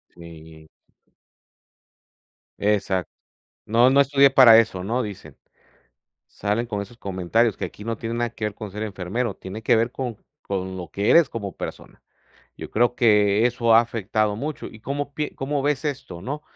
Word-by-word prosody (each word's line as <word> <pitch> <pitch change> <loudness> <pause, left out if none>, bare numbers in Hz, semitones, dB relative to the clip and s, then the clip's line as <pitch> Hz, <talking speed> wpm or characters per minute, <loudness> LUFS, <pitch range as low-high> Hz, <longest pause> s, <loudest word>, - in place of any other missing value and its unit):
Sí. 80 -2 -13 1.9
Exacto. 100 -4 0 0.5
"No, 120 +4 +4
no 140 +1 +5
estudié 140 0 +5
para 130 -4 +8
eso", 100 -5 -1
¿no?, 120 +5 -1
dicen. 105 -3 -9 0.9
Salen 105 +4 -2
con 105 -3 -3
esos 120 +3 -13
comentarios 100 +3 0
que - - -4
aquí 105 - -9
no 115 -1 -3
tiene 115 +1 -5
nada 120 0 -1
que 110 -1 -7
ver 105 - -2
con 105 -1 -8
ser 105 +2 -6
enfermero, 100 +2 -3
tiene 100 +4 -9
que 115 - +3
ver 115 +2 +1
con 125 -4 -4 0.3
con 95 -1 -4
lo 85 -4 -8
que 100 +2 0
eres 165 -5 +6
como 100 -4 -6
persona. - - -8 0.5
Yo - - -8
creo 120 +2 +1
que 105 -1 +4
eso 115 -2 +2
ha - - +8
afectado 110 -2 -1
mucho, 145 +7 -5
¿y 110 - -12
cómo 140 +3 -4
pie 150 -1 -3
cómo 140 +1 -2
ves 145 0 0
esto, 135 - -5
no?, 145 +7 -5
110 Hz, 170 wpm, -23 LUFS, 100-125 Hz, 1.9 s, para